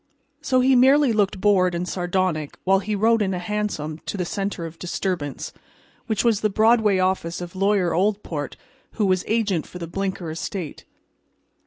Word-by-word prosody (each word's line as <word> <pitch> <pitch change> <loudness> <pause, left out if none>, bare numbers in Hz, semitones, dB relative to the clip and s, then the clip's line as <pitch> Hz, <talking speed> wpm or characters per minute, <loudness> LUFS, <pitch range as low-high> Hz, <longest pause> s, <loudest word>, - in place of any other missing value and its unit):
So 255 -1 +2
he 260 +1 +4
merely 265 +1 +5
looked 200 -3 +1
bored 185 -3 +3
and 175 +1 -2
sardonic 175 -5 -1
while 190 +1 +4
he 210 +2 -2
rode 225 +2 +3
in 190 -2 0
a - - -2
hansom 175 -5 -3
to - - -3
the 180 - -1
center 195 -2 -3
of 165 0 -9
disturbance, 175 -5 -3 0.5
which 220 -3 0
was 230 -4 +2
the 215 - +2
Broadway 220 -1 +3
office 185 -2 0
of 175 0 -8
Lawyer 195 -2 +2
Oldport, 180 -6 -1 0.4
who 215 - 0
was 185 -1 +2
agent 210 -7 0
for - - -9
the 170 - -5
Blinker 185 -1 -3
estate. 165 0 -5
190 Hz, 170 wpm, -23 LUFS, 175-210 Hz, 0.5 s, merely